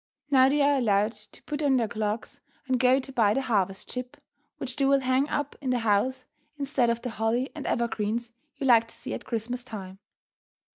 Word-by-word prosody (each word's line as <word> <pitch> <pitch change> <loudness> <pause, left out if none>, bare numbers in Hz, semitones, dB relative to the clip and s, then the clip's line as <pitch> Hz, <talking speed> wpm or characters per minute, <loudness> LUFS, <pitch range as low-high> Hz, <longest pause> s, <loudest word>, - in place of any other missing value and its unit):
Now 260 -1 +6
they 290 +1 +3
are 285 0 +4
allowed 210 -2 +2
to 210 -2 -14
put 295 0 -4
on 275 -3 +3
their 230 -3 +1
clogs 215 0 -3 0.2
and 260 -2 +1
go 255 +1 +5
to 270 0 -7
buy 215 -4 +3
the 270 - 0
"harvest 195 -6 -1
ship," 250 0 -6 0.4
which 255 -2 -5
they 275 - +1
will 275 0 +4
hang 260 +2 +1
up 290 -1 -2
in 265 - -2
the 250 - +2
house 235 +4 +1 0.3
instead 275 -4 +1
of 235 0 -1
the 245 - -3
holly 225 +4 0
and 300 - -6
evergreens 235 0 -1 0.3
you 275 - -3
like 230 -3 +5
to - - -15
see - - -6
at - - -6
Christmas 240 +2 -3
time. 195 -5 -8
245 Hz, 205 wpm, -27 LUFS, 220-265 Hz, 0.4 s, Now